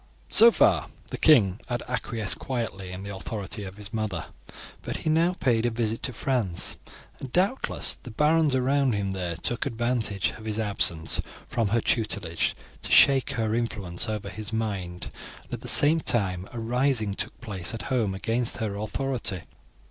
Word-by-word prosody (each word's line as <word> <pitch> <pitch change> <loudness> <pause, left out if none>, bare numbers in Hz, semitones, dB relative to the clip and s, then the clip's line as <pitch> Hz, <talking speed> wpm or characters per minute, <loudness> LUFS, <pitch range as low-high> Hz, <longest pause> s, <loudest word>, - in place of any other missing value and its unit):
"So 230 +2 +9
far - - +3 0.2
the - - -4
king 110 - +5
had 120 -1 -2
acquiesced 115 -4 0
quietly 115 -7 -4
in 90 +1 -7
the 100 0 -6
authority 100 +1 -5
of 95 +1 -9
his 105 +1 -8
mother, 110 -3 -2 0.6
but - - -4
he 155 - +3
now 165 +3 +3
paid 115 -4 +2
a 120 - +2
visit 115 -1 -1
to 130 - -2
France, 115 -7 -1 0.4
and 135 - -7
doubtless 195 - +1
the - - -9
barons 150 +3 +3
around 135 0 +2
him 100 -1 -1
there 90 -3 -3
took 120 - -1
advantage 115 -5 -1
of 110 - -11
his 110 -1 -2
absence 100 -7 0 0.3
from 115 -3 0
her 115 +3 +1
tutelage 100 -8 0 0.3
to - - -4
shake 135 -2 +6
her 110 -2 -1
influence 110 -5 -2
over 105 -2 -3
his 105 +3 -7
mind; 100 -6 -3 0.3
and - - -13
at - - -4
the - - -8
same 155 +3 +6
time 95 -8 0
a 120 - -6
rising 120 -2 +1
took - - -3
place 95 -8 -3
at 115 - -6
home 110 -6 +1
against 115 +4 -1
her 110 -3 -3
authority. 110 -3 -2
110 Hz, 170 wpm, -26 LUFS, 100-125 Hz, 0.6 s, So